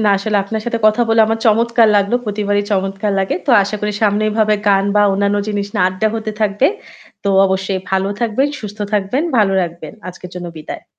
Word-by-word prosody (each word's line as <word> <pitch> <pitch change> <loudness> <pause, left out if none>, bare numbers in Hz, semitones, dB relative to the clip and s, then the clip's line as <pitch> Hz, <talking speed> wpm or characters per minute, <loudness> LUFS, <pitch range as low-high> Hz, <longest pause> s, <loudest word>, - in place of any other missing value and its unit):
না - - +4
আসলে 210 +2 -1
আপনার 220 +2 -4
সাথে 230 -1 -1
কথা 215 +3 +3
বলে 225 0 +3
আমার 225 0 -1
চমৎকার 230 +1 +3
লাগলো। 200 +3 +1
প্রতিবারই 205 -1 -1
চমৎকার 195 +1 -1
লাগে। 190 - 0
তো - - +2
আশা 200 +2 -3
করি 210 0 -2
সামনে 210 0 +2
এভাবে 215 0 +2
গান 195 0 +3
বা 205 - +5
অন্যান্য 200 +1 +1
জিনিস 205 -1 -2
না - - +1
আড্ডা 185 +4 -1
হতে 220 -1 -3
থাকবে। 210 +5 +2 0.6
তো - - 0 0.2
অবশ্যই 190 0 -2
ভালো 190 0 0
থাকবেন, 235 +5 +1
সুস্থ 210 0 -8
থাকবেন, 210 +7 0
ভালো 205 -3 +3
রাখবেন। 170 -3 -7 0.2
আজকের 180 0 -10
জন্য 175 -1 -6
বিদায়। 155 - -8
205 Hz, 195 wpm, -17 LUFS, 195-220 Hz, 0.6 s, বা